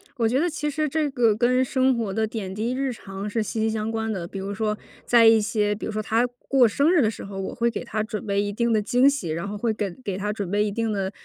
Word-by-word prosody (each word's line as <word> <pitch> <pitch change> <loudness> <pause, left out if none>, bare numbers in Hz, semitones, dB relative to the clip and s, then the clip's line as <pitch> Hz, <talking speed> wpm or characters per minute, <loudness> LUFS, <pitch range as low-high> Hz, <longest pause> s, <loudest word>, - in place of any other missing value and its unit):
我 235 -4 0
觉 250 +4 +2
得 345 +3 +1
其 300 -1 -2
实 305 +1 -1
这 305 +1 0
个 240 -6 +2
跟 250 +3 +3
生 260 0 +2
活 220 -4 -2
的 220 +2 +1
点 205 -4 -5
滴 230 +4 -1
日 265 -1 -1
常， 195 -1 -7
是 220 +1 0
息 220 - -4
息 220 0 +2
相 220 0 -2
关 225 0 -2
的。 185 -5 -3
比 195 +3 -7
如 195 +1 -4
说 215 0 -1 0.3
在 235 -1 +6
一 225 -1 +7
些 210 -1 0
比 210 - -6
如 - - -3
说 215 0 -2
她 225 +3 +1 0.2
过 270 -2 +5
生 280 +8 +2
日 350 -3 +4
的 220 -3 +2
时 - - -9
候， 195 -1 -8
我 190 - -4
会 235 -1 +1
给 235 - -4
她 220 -3 -2
准 215 -1 -4
备 200 -1 +1
一 205 0 -2
定 235 +2 0
的 215 -2 +3
惊 250 +6 +4
喜， 275 - -3
然 165 +3 -3
后 205 +1 -5
会 220 +1 0
跟 205 +2 -4
给 195 -6 -3
她 210 +1 -2
准 200 -4 -4
备 205 +1 +2
一 210 - -1
定 225 +1 -1
的 195 -1 -2
220 Hz, 315 characters per minute, -24 LUFS, 205-245 Hz, 0.3 s, 一